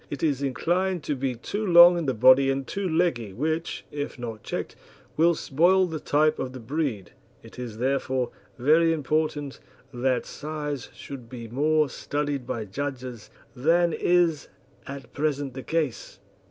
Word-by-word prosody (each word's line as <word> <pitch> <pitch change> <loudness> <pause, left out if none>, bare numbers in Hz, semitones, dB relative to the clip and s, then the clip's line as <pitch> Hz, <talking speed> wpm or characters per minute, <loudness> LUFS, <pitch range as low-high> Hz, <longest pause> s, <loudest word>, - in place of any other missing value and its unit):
It 145 - -5
is 145 -4 +1
inclined 175 +6 0
to 150 - -1
be 130 -1 -2
too 205 - -4
long 175 -2 +8
in 170 -4 -2
the 130 - 0
body 130 +4 +6
and 135 0 -1
too 195 +4 -3
leggy, 160 - 0
which, 160 - -2
if 145 -2 -5
not 115 -3 -6
checked, - - -5 0.4
will 170 +2 +4
spoil 175 +7 +3
the 160 -3 -4
type 155 +2 +2
of 130 - -4
the 130 - -7
breed. 120 - -3 0.3
It - - -13
is, 120 -3 -6
therefore, 130 -1 0 0.3
very 160 +6 +4
important 150 -1 -1 0.3
that 125 0 0
size 150 -2 -5
should 125 -4 -9
be 120 -3 -8
more 150 +5 +2
studied 145 0 -3
by 110 -2 -3
judges 125 0 -5 0.3
than 165 +6 +3
is 175 -4 +2 0.4
at 135 -3 -8
present 145 -2 -1
the 130 - -6
case. 155 -9 -2
145 Hz, 155 wpm, -26 LUFS, 130-160 Hz, 0.4 s, long